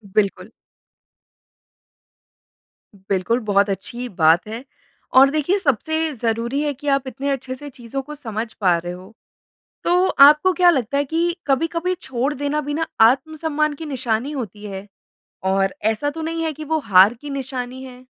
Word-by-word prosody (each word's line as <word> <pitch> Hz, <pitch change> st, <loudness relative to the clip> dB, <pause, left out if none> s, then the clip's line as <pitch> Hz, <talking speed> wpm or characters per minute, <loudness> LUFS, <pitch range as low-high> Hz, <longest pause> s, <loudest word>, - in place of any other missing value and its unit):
बिल्कुल। 200 Hz, -2 st, 0 dB, 2.6 s
बिल्कुल, 200 Hz, +5 st, +1 dB
बहुत 205 Hz, -2 st, +2 dB
अच्छी 240 Hz, +5 st, -4 dB
बात 165 Hz, +2 st, +3 dB
है। 225 Hz, +4 st, -6 dB, 0.5 s
और 270 Hz, +1 st, +7 dB
देखिए, 310 Hz, +7 st, +1 dB
सबसे 315 Hz, -, 0 dB
ज़रूरी 235 Hz, +3 st, -1 dB
है 295 Hz, -1 st, -1 dB
कि 290 Hz, +2 st, -10 dB
आप 275 Hz, -1 st, +1 dB
इतने 275 Hz, +2 st, -4 dB
अच्छे 260 Hz, -1 st, -3 dB
से 290 Hz, +2 st, -9 dB
चीज़ों 250 Hz, +1 st, -6 dB
को 300 Hz, +2 st, -9 dB
समझ 225 Hz, -4 st, -5 dB
पा 180 Hz, -5 st, +2 dB
रहे 175 Hz, +1 st, -5 dB
हो। 185 Hz, +4 st, -12 dB, 0.7 s
तो 360 Hz, +2 st, +3 dB
आपको 300 Hz, +6 st, +6 dB
क्या 355 Hz, -1 st, +5 dB
लगता 275 Hz, -2 st, 0 dB
है 285 Hz, -, +1 dB
कि 335 Hz, +4 st, -1 dB
कभी-कभी 330 Hz, +6 st, 0 dB
छोड़ 265 Hz, +2 st, -2 dB
देना 290 Hz, +2 st, -1 dB
भी 290 Hz, 0 st, -4 dB
ना 320 Hz, +1 st, -1 dB
आत्म-सम्मान 305 Hz, +4 st, +2 dB
की 320 Hz, +2 st, -8 dB
निशानी 260 Hz, 0 st, -2 dB
होती 210 Hz, -6 st, -6 dB
है। 195 Hz, 0 st, -7 dB, 0.6 s
और 195 Hz, 0 st, +1 dB
ऐसा 225 Hz, +7 st, +1 dB
तो 320 Hz, +1 st, -7 dB
नहीं 330 Hz, +1 st, -3 dB
है 315 Hz, -, -1 dB
कि 310 Hz, +2 st, -8 dB
वो 315 Hz, +1 st, 0 dB
हार 200 Hz, -3 st, +5 dB
की 290 Hz, +4 st, -10 dB
निशानी 260 Hz, -1 st, -5 dB
है? 255 Hz, 0 st, -12 dB
270 Hz, 160 wpm, -21 LUFS, 225-300 Hz, 2.6 s, और